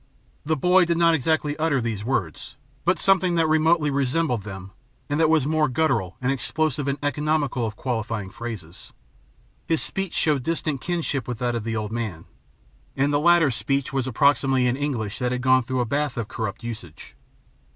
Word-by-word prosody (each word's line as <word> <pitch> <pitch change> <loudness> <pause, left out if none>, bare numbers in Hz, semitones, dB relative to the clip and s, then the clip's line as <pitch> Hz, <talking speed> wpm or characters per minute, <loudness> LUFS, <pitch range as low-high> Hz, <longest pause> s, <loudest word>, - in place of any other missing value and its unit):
The 155 +2 0
boy 180 +5 +4
did 170 0 0
not 170 -1 +4
exactly 155 0 0
utter 155 -3 +1
these 115 -4 -3
words, 105 - -3 0.3
but 180 -1 +2
something 190 -2 +3
that 165 -1 +3
remotely 155 -1 +3
resembled 140 -2 0
them 95 -1 -8 0.4
and 145 +2 -1
that 160 -1 +4
was 160 -4 +3
more 155 0 +2
guttural 120 - 0
and 130 +1 0
explosive 145 +2 -1
and 140 0 0
economical 145 -4 0
of 105 - -6
qualifying 110 -5 -3
phrases. 100 -8 -8 0.7
His 165 -2 +2
speech 195 -2 -3
showed 150 -4 +2
distant 155 -2 -2
kinship 165 -7 -2
with 120 -2 -3
that 120 +1 -1
of 115 -2 -3
the 115 0 -3
old 110 -1 -3
man, 110 -8 -4 0.7
and 140 +2 +1
the 145 - +3
latter's 165 -3 +4
speech 135 +6 -1
was 135 -1 -1
approximately 135 0 +3
an 125 0 +2
English 125 -7 -3
that 125 -1 0
had 125 0 -2
gone 130 0 +5
through 130 +1 -2
a - - 0
bath 140 +3 -1
of 115 -3 -2
corrupt 110 0 -5
usage. 110 -9 -8
135 Hz, 180 wpm, -24 LUFS, 115-155 Hz, 0.7 s, gone